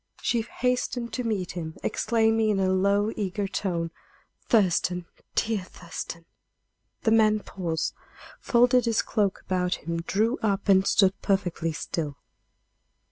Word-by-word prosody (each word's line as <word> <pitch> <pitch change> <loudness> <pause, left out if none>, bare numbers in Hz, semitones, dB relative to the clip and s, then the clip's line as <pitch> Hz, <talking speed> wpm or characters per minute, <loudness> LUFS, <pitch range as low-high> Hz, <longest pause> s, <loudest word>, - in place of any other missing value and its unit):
She 235 - +2
hastened 245 0 -2
to 250 - -2
meet 205 -6 -1
him, 160 -3 -6
exclaiming 225 -1 +2
in 205 -2 +2
a 190 -1 +2
low, 200 +3 +2
eager 200 0 -2
tone: 170 -4 -2 0.6
"Thurston! 180 -4 +2 0.3
dear 220 -3 +1
Thurston!" 170 -1 -8 0.8
The 220 - +3
man 215 -1 +4
paused, 170 -6 -3 0.5
folded 245 0 +4
his 230 -1 +2
cloak 205 -4 0
about 180 -1 0
him, 170 0 -4
drew 220 +8 0
up, 200 -3 0
and 195 -1 +5
stood 195 -1 +3
perfectly 180 -4 0
still. 150 -2 -4
200 Hz, 130 wpm, -26 LUFS, 180-225 Hz, 0.8 s, and